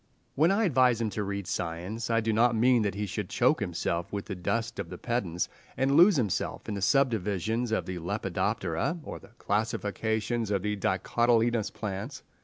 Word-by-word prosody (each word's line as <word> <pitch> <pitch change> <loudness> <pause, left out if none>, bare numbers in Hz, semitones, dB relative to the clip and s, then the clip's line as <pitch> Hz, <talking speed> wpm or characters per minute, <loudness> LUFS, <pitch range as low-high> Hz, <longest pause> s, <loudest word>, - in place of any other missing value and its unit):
When 160 +4 +3
I 200 +3 +2
advise 130 - +3
him 110 -2 -1
to 105 +2 -2
read 100 -1 -3
science, 90 +8 -3
I 115 0 +2
do 110 0 0
not 115 +2 +3
mean 120 +1 +4
that 100 -2 -1
he 105 +1 -2
should 100 -1 -4
choke 130 +6 +3
himself 85 -3 -2
with 100 -1 -4
the 105 - -5
dust 110 +5 -2
of - - -4
the - - -7
pedants, 100 -8 -1 0.3
and 135 +1 +2
lose 180 +4 +7
himself 110 - -1
in 110 - -3
the 100 - -4
subdivisions 110 - +1
of 110 - 0
the 90 -1 -5
Lepidoptera, 85 - -1
or - - -7
the - - -18
classifications 110 +2 -1
of 100 -2 0
the 105 0 0
dicotyledonous 115 +3 +1
plants. 100 -3 -5
110 Hz, 185 wpm, -28 LUFS, 100-120 Hz, 0.3 s, lose